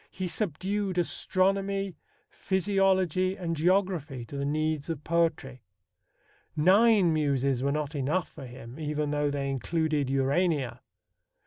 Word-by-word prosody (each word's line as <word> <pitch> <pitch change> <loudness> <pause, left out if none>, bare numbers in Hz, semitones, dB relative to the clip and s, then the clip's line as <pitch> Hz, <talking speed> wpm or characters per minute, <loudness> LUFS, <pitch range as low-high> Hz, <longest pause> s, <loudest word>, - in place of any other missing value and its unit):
He 185 -1 -4
subdued 190 +2 -2
astronomy, 195 +1 0 0.4
physiology, 190 -1 +1
and 170 -4 -3
geography 165 -6 0
to 140 - -10
the 140 0 -2
needs 155 +1 -1
of 155 -3 -4
poetry. 155 -6 0 0.9
Nine 190 +2 +5
Muses 140 -4 +1
were 140 +1 +1
not 150 0 -2
enough 150 +5 -1
for 135 - -10
him, 125 +2 -11
even 150 -1 -2
though 145 0 +1
they 140 -1 -2
included 150 +1 -1
Urania. 135 +1 0
160 Hz, 120 wpm, -28 LUFS, 140-185 Hz, 0.9 s, Nine